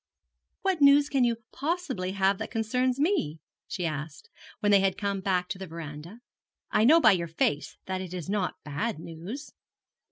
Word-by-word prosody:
'What 380 -5 +1
news 285 +1 +6
can 270 -3 +2
you 235 -1 +2 0.2
possibly 275 - -2
have 195 0 +2
that 220 - -4
concerns 250 +3 0
me?' 295 - +1 0.3
she 180 - -3
asked, 150 -1 -5 0.3
when 205 -2 +2
they 200 - +7
had 195 -1 +1
come 200 -2 -2
back 185 -2 0
to 190 -1 -4
the 190 - -6
verandah. 165 +6 -8 0.5
'I 215 - +4
know 315 +7 +7
by 220 -9 +7
your 170 -3 0
face 155 -2 -1
that 185 0 -3
it 185 -2 -7
is 180 -4 -5
not 200 -2 -1
bad 155 +9 -2
news.' 170 - -8
195 Hz, 180 wpm, -28 LUFS, 170-250 Hz, 0.5 s, they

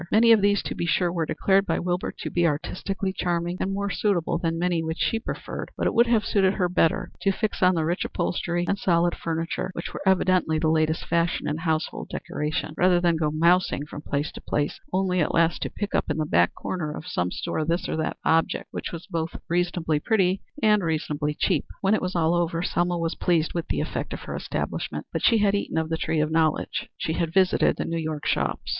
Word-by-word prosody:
Many 230 +2 +6
of 220 -2 +6
these, 205 0 +3
to - - -3
be 170 - -3
sure, 175 0 +2
were 165 -3 -1
declared 195 0 +2
by - - +1
Wilbur 180 0 -1
to - - -5
be 175 -1 +3
artistically 190 +5 -2
charming 175 0 -1
and 190 - -1
more 200 0 -2
suitable 195 -6 0
than 165 -1 -1
many 175 -1 +1
which 160 +1 -3
she 225 - +1
preferred, - - -6
but - - -1
it - - +1
would 235 +1 +5
have 230 -3 +2
suited 190 -1 +2
her 180 -3 +1
better 175 -2 +1
to 195 - +3
fix 215 +2 -2
on 185 0 +5
the 160 -2 0
rich 175 +3 0
upholstery 175 0 -1
and 200 - 0
solid 175 -1 +2
furniture, 165 +2 -3
which 170 - -6
were - - -6
evidently 185 -4 +3
the 155 0 +1
latest 160 0 +1
fashion 170 0 0
in 150 - -1
household 160 - -2
decoration, 150 +1 -3
rather 180 -1 +4
than 175 -1 +2
go 155 -1 +1
mousing 170 -1 +2
from 150 - -8
place 145 0 -2
to - - -10
place, 145 0 -1
only 185 -1 +1
at 155 - +1
last 165 0 +2
to - - -2
pick 205 -1 -5
up - - 0
in 150 - -1
the 155 - 0
back 85 - +2
corner 170 -5 -3
of - - -8
some 90 0 -1
store 155 - -2
this 170 +3 -1
or - - -2
that 160 0 -2
object 165 0 +1
which - - -5
was 170 0 -7
both 165 0 -3
reasonably 175 -3 0
pretty 190 0 +1 0.2
and 210 -1 +5
reasonably 150 -2 -1
cheap. 175 -7 +1 0.2
When 195 +1 +3
it 215 - +2
was 185 0 -3
all 165 -1 +2
over 170 -1 0
Selma 175 0 0
was 165 0 -1
pleased 165 -3 +1
with 170 -2 -3
the - - -1
effect - - -4
of - - -6
her - - -6
establishment, - - -3
but - - -2
she 230 - +5
had 205 -2 +3
eaten 200 -4 -1
of 160 0 0
the 160 - 0
tree 160 -1 0
of 155 +1 0
knowledge. 160 -1 0
She 160 - -2
had 165 -1 -1
visited 185 0 +3
the - - -2
New 165 0 -2
York 155 -2 -4
shops. - - -1
170 Hz, 230 wpm, -25 LUFS, 160-185 Hz, 0.2 s, Many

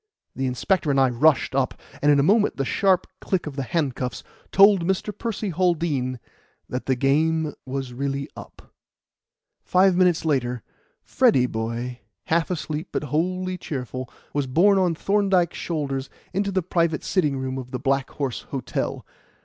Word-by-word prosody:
The 130 0 -1
inspector 155 +6 0
and 135 -1 +3
I 130 -2 +4
rushed 140 +5 +3
up, 135 -1 0 0.3
and 150 - +5
in 145 - +4
a - - +4
moment 210 +6 +3
the 135 - 0
sharp 185 +5 +2
click 185 -3 -1
of 150 -3 -6
the 140 - -2
handcuffs 130 -3 -2 0.3
told 195 -2 +6
Mr. 190 +3 -1
Percy 220 -3 -3
Haldean 160 -7 0 0.5
that 125 - -5
the 130 - +2
game 155 +4 +1
was 130 -1 -4
really 140 +2 -2
up. - - -13 0.9
Five 185 0 +4
minutes 180 -3 +3
later 125 -6 0 0.4
Freddy 125 -2 +3
boy, 120 +2 -4 0.2
half 165 0 +1
asleep, 155 -1 -3
but - - -2
wholly 185 +3 -1
cheerful, 130 -4 -5 0.2
was 145 -2 0
borne 190 +9 +4
on 180 -3 +2
Thorndyke's 195 -2 +1
shoulders 140 -5 -3 0.2
into 200 +1 0
the 190 -2 0
private 170 -2 0
sitting 150 -8 +1
room 130 0 -3
of 125 -1 -8
the 125 - -3
Black 135 0 0
Horse 135 -5 -3
Hotel. 135 -2 -3
150 Hz, 155 wpm, -24 LUFS, 130-180 Hz, 0.9 s, told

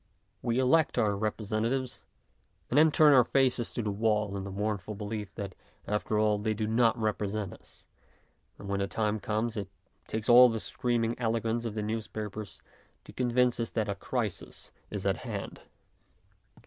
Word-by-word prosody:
We 120 0 0
elect 130 +5 +3
our 105 -2 +2
representatives, 110 +5 -2 0.7
and 130 - +2
then 160 0 +6
turn 150 -1 +6
our 130 -2 +7
faces 130 -2 +1
to 120 - -2
the 105 - -1
wall 105 -1 0
in 95 -1 -4
the - - -5
mournful 105 0 -3
belief 105 0 -5
that 100 -3 -5 0.3
after 105 +1 -1
all 105 -1 +2
they 110 +1 -1
do 110 +1 -1
not 115 +2 +3
represent 105 -2 -2
us, - - -16 0.7
and 100 - -9
when 100 0 -1
the 100 - 0
time 110 +1 -1
comes 110 +2 -1
it 100 -2 -4 0.4
takes 110 0 -3
all 125 +1 +9
the 115 -1 -2
scream 120 +5 -1
ing 115 +2 -2
eloquence 115 0 0
of 110 -2 -4
the 105 - -2
newspapers 110 -2 -5 0.4
to - - -13
convince 125 0 +2
us 115 - -1
that 110 -2 -1
a - - +1
crisis 105 +1 -4 0.2
is - - -5
at - - +2
hand. - - -6
110 Hz, 175 wpm, -30 LUFS, 105-120 Hz, 0.7 s, all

